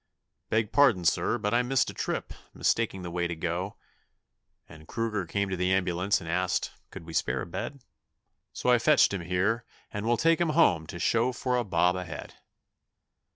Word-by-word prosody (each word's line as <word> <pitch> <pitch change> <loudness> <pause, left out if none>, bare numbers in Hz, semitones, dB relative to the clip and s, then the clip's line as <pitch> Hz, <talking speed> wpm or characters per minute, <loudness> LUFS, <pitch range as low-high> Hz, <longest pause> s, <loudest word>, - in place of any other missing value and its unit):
'Beg 110 -1 +1
pardon, 125 -10 +4
sir, 120 - +2
but 105 -1 -2
I 120 - +4
missed 125 +1 +1
a - - -14
trip, - - -3 0.2
mistaking 105 -5 0
the 85 - -5
way 85 0 -1
to 85 - -4
go; 90 +4 -3 0.9
And 80 0 -14
Kruger 110 -5 -2
came 100 +3 -1
to - - 0
the 90 +1 0
ambulance 95 +1 +1
and 85 - -10
asked 90 +2 0 0.2
could - - -10
we 80 - -9
spare 65 -4 0
a - - -6
bed, 130 +9 -6 0.7
So 125 - 0
I 120 - +5
fetched 145 -3 +4
him 95 - -2
here, 95 +7 0 0.3
and 105 +2 -4
we'll 120 0 +3
take 165 +4 +3
him 170 - +2
home 85 - +4
to 85 - -7
show 115 +7 +2
for 125 0 -1
a 125 - +1
bob 90 -3 +2
a 90 0 -4
head.' 80 - -8
95 Hz, 195 wpm, -28 LUFS, 85-120 Hz, 0.9 s, I